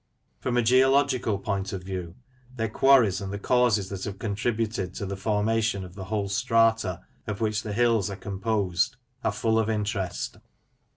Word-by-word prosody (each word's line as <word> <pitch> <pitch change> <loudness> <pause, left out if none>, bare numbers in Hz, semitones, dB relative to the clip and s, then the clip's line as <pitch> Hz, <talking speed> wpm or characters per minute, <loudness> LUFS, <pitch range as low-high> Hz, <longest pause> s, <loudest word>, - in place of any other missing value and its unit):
From 125 -1 -1
a 120 - +3
geological 130 -2 +3
point 100 -1 -3
of 95 -2 -5
view, 90 -2 -5 0.4
their 115 -2 -1
quarries, 125 -5 +4
and 95 -1 -4
the 100 - -3
causes 110 -3 +2
that 95 -1 -5
have 100 -2 -5
contributed 105 -2 -2
to 100 - -4
the 100 0 -4
formation 105 0 0
of 90 - -12
the 95 -1 -7
whole 105 0 -1
strata 110 -2 +2 0.3
of 105 -2 -3
which 110 -1 0
the 105 - -5
hills 115 -2 +2
are 100 - -4
com 95 0 -6
posed, 100 0 0 0.3
are - - +2
full 110 +2 +1
of 110 0 0
interest. 100 - -2
105 Hz, 175 wpm, -26 LUFS, 95-115 Hz, 0.4 s, quarries